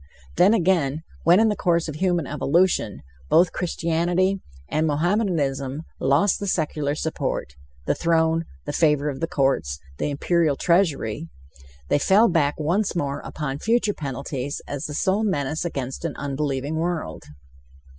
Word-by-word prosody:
Then, 195 +5 +5
again, 165 -6 +1 0.2
when 175 +3 +6
in 220 0 +4
the 210 - 0
course 170 -3 +1
of 155 - -4
human 175 -3 +1
evolution, 145 - +1 0.3
both 170 +1 +5
Christianity 175 +3 0 0.3
and 155 - 0
Mohammedanism 150 -5 0 0.2
lost 145 +9 +2
the 200 - -4
secular 150 -4 -1
support 150 - -3 0.3
the - - +2
throne, 165 -1 +1 0.2
the 145 - -4
favor 150 -2 +2
of 135 -2 -5
the 165 - -1
courts, 135 - 0 0.2
the - - 0
imperial 155 +1 +1
treasury 160 - +1 0.6
they - - +3
fell 205 +9 +5
back 155 -6 +1
once 180 +7 0
more 140 -4 -1
upon 140 -2 -5
future 225 0 +1
penalties 140 -1 -4
as 145 -1 -4
the 150 - -6
sole 195 +6 +1
menace 160 -5 -1
against 135 -5 -4
an 165 -3 -3
unbelieving 140 +1 -2
world. 165 - -3
160 Hz, 145 wpm, -23 LUFS, 140-175 Hz, 0.6 s, when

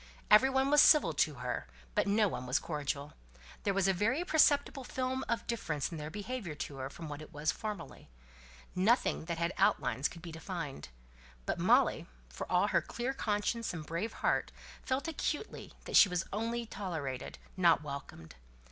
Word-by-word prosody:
Every 215 +6 +8
one 265 +1 +2
was 295 0 +8
civil 300 - +6
to 150 +1 +1
her, - - -4 0.3
but - - +1
no 210 +1 +3
one 125 -8 -5
was 125 +3 +2
cordial; 145 -2 -3 0.5
there 200 - 0
was 195 -1 +2
a 195 - +4
very 230 - +1
perceptible 285 -4 +3
film 260 +1 -2
of 235 0 -1
difference 165 - -2
in 165 - -5
their 150 0 -5
behaviour 205 -3 -5
to 145 -1 -6
her 130 0 -4
from 160 +3 -8
what 145 0 -6
it 155 - -11
was 155 +1 0
formerly; 210 - -7 0.6
nothing 205 -1 +2
that 170 0 -3
had 170 +1 -1
outlines 130 +5 +2
and - - -11
could 170 - -11
be 170 - -7
defined. 160 - -6 0.6
But - - -2
Molly, - - +3 0.2
for - - -7
all - - +3
her - - +3
clear 245 +3 -3
conscience 220 -3 -1
and 160 - -5
her - - -17
brave 170 +7 -3
heart, - - +1 0.3
felt 265 +4 -2
acutely 315 +3 -4
that - - -3
she 200 - +8
was 180 0 -1
only 230 +3 -2
tolerated, 160 - -5 0.2
not 170 -5 +4
welcomed. 140 - -8
185 Hz, 185 wpm, -32 LUFS, 150-235 Hz, 0.6 s, Every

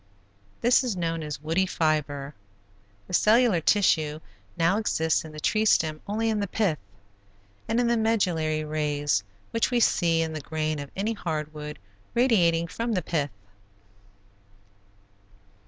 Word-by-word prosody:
This 245 +3 +4
is 240 -6 -2
known 165 -1 -2
as 150 -1 -6
woody 170 +5 +1
fiber. 150 -4 -1 0.7
The - - -11
cellular 215 -2 +4
tissue 155 -5 +2 0.4
now 170 +5 +2
exists 160 -7 +1
in 160 - -10
the 155 - -8
tree 215 +7 +1
stem 155 -7 +2
only 220 +3 -1
in 215 - -1
the 200 - -1
pith, 180 -5 0 0.9
and 225 +2 +1
in 245 - +2
the 235 0 +2
medullary 175 -9 +1
rays 145 -7 0 0.3
which 230 - +1
we 245 -1 +1
see 165 -7 +3
in 160 -1 -4
the 155 - -5
grain 155 0 -2
of 145 -1 -7
any 210 +4 -1
hard 155 -6 -4
wood, 150 0 -7 0.4
radiating 180 -10 +3
from 230 +7 -3
the 180 -4 -1
pith. 150 -3 -1
165 Hz, 145 wpm, -26 LUFS, 155-215 Hz, 0.9 s, This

